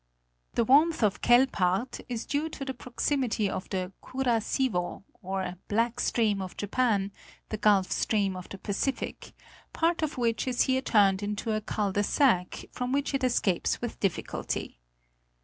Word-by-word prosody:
The 235 - +3
warmth 295 +3 +4
of 205 -2 +1
Quelpaert 240 -3 +3
is 235 -2 -3
due 295 +3 -1
to 280 -3 -6
the 265 - -3
proximity 250 -3 -1
of 190 - -4
the 185 -1 -2
Kura 255 -3 0
siwo, 215 -9 -1 0.2
or 190 -1 -3
Black 230 +3 0
Stream 215 -6 +1
of 185 -1 -7
Japan, 205 -2 +1 0.4
the 215 - -3
Gulf 205 -3 +3
Stream 200 -3 +1
of 180 -1 -8
the 195 - -7
Pacific, 205 +8 -3 0.4
part 330 +1 +1
of 310 -2 -2
which 230 0 0
is 250 -1 +2
here 260 0 +1
turned 200 -6 +3
into 210 +2 -2
a 215 0 0
cul 205 -1 -1
de 205 - +1
sac, 205 -5 +2
from 250 0 -3
which 285 +1 0
it 275 -1 0
escapes 225 -7 +1
with 240 - -5
difficulty. 185 - -3
225 Hz, 160 wpm, -28 LUFS, 195-260 Hz, 0.4 s, warmth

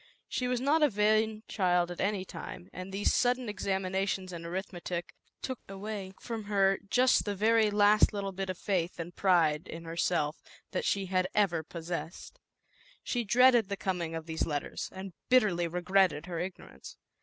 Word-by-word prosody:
y - - -27 0.3
She 250 - -1
was 250 -1 0
not 290 +5 +2
a 300 - +5
vain 215 0 +2
child 180 -3 +1
at 175 - -5
any 200 -1 0
time, 180 -1 -9
and 185 +1 -7
these 200 +1 +1
sudden 250 0 +2
examinations 190 -1 -2
in 170 - -6
arith 185 +4 -5
metic 175 0 -5 0.3
took 260 -2 -3
away 195 -1 -6
from 225 -3 -5
her 195 -2 +2
just 255 +3 +4
the 205 -1 -2
very 220 +2 +4
last 210 +1 +5
little 200 -2 -3
bit 190 0 -4
of 185 - -3
faith 180 -3 -1
and 170 +1 -6
pride 170 -4 +3
in 165 +1 -7
herself 165 -2 0 0.3
that - - -2
she 195 -1 +1
had 185 0 +1
ever 185 -6 +2
possessed. 170 - -6 0.6
She 245 -2 -1
dreaded 240 -1 +5
the 200 - -2
coming 175 -4 -2
of 160 -1 -5
these 160 -1 -2
let 145 -2 -1
ters, - - -6
and 190 -1 -8 0.2
bitterly 205 -9 +4
regretted 180 -2 +2
her 175 -2 -4
ignorance. 180 +1 -8
190 Hz, 180 wpm, -30 LUFS, 175-210 Hz, 0.6 s, a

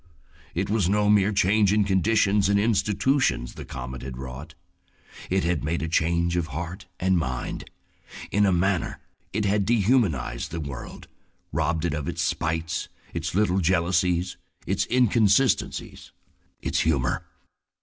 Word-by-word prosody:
It 95 +3 0
was 100 -4 +1
no 105 +1 +3
mere 105 0 +4
change 100 +1 +3
in 105 0 +3
conditions 100 +1 +2
and 100 0 +3
institutions 105 - +1
the - - -9
comet 65 0 -7
had 65 -1 -7
wrought. 65 +3 -8 0.7
It 95 +1 +1
had 85 -1 0
made 80 +2 -1
a - - -1
change 85 +1 +1
of 85 -2 0
heart 85 +6 -6
and 95 -1 +2
mind. 65 -5 -4 0.6
In 105 0 +3
a - - +3
manner 90 0 0 0.3
it 105 +1 -1
had 100 0 +2
dehumanized 100 - +1
the 85 - -5
world, 70 -5 -7 0.4
robbed 80 +1 0
it 85 - 0
of 75 -2 -3
its 85 0 -2
spites, 80 -1 -2 0.2
its 85 0 -3
little 95 -2 +2
intense 90 -4 +1
jealousies, 90 0 +1 0.3
its - - 0
inconsistencies, 120 0 +2 0.5
its - - 0
humor. 70 -6 0
90 Hz, 145 wpm, -25 LUFS, 80-100 Hz, 0.7 s, mere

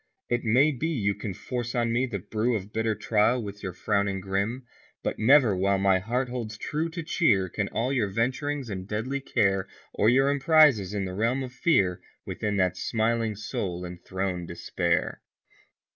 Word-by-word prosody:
It 120 0 0
may 130 +6 +4
be 150 +3 -2
you 110 -11 0
can 100 -2 -6
force 120 +3 -4
on 120 -1 +1
me 125 +2 +1
the 110 -5 -3
brew 110 +5 -1
Of 100 0 -5
bitter 110 -1 0
trial 110 +3 +2
with 105 0 -8
your 95 - -4
frowning 100 +1 0
grim. 100 +7 -2 0.4
But - - -2
never 125 -3 +5
while 100 +1 +2
my 95 -1 +3
Heart 120 +7 -1
holds 115 -3 -5
true 155 +8 -2
to 165 0 -5
cheer 115 - +2
Can 100 +3 -2
all 125 +6 -1
your 120 -6 +1
venturings 130 +6 -1
in 95 -3 -5
deadly 115 +7 -2
care, 95 -7 +1 0.3
Or 105 - +3
your 135 +3 +4
emprises 140 - +4
in 100 -1 -1
the 90 - -5
realm 115 +7 0
of 125 -1 -7
fear, 100 - +2 0.2
Within 105 -1 -2
that 90 -1 +1
smiling 115 +1 0
Soul 90 -3 -4
enthrone 90 0 -4
Despair. 85 - -1
110 Hz, 175 wpm, -27 LUFS, 100-125 Hz, 0.4 s, never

